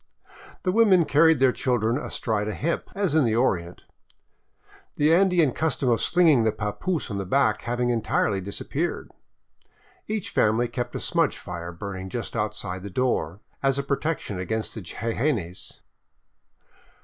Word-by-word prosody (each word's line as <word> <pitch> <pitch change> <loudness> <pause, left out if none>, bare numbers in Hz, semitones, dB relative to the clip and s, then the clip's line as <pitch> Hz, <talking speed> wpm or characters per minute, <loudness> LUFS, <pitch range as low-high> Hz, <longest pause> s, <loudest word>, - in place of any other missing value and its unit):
The 185 - +1
women 190 -5 +5
carried 160 +2 +5
their 130 0 +4
children 120 -1 0
astride 110 -7 -2
a 110 - -3
hip, 170 +4 -2
as 195 -6 0
in 155 -2 +4
the 115 -3 +1
Orient, 90 -8 0 1.1
the 150 +2 +3
Andean 175 -5 +4
custom 145 -2 0
of 115 - +2
slinging 165 -8 +4
the 110 - +2
papoose 120 - -3
on 100 - -3
the - - -2
back 135 +9 +2
having 120 +1 -1
entirely 110 -3 0
disappeared. 135 - -4 1.0
Each 215 -3 -3
family 110 +3 +2
kept 120 +1 -4
a - - -2
smudge - - +1
fire 85 0 -6
burning 95 +1 -6
just 120 +4 -5
outside 105 -4 -3
the 100 - -7
door, 100 -6 -1 0.2
as 135 0 +2
a 140 - -1
protection 140 - -2
against 110 +4 -2
the 110 - -6
jejenes. 110 - -3
120 Hz, 150 wpm, -25 LUFS, 105-155 Hz, 1.1 s, women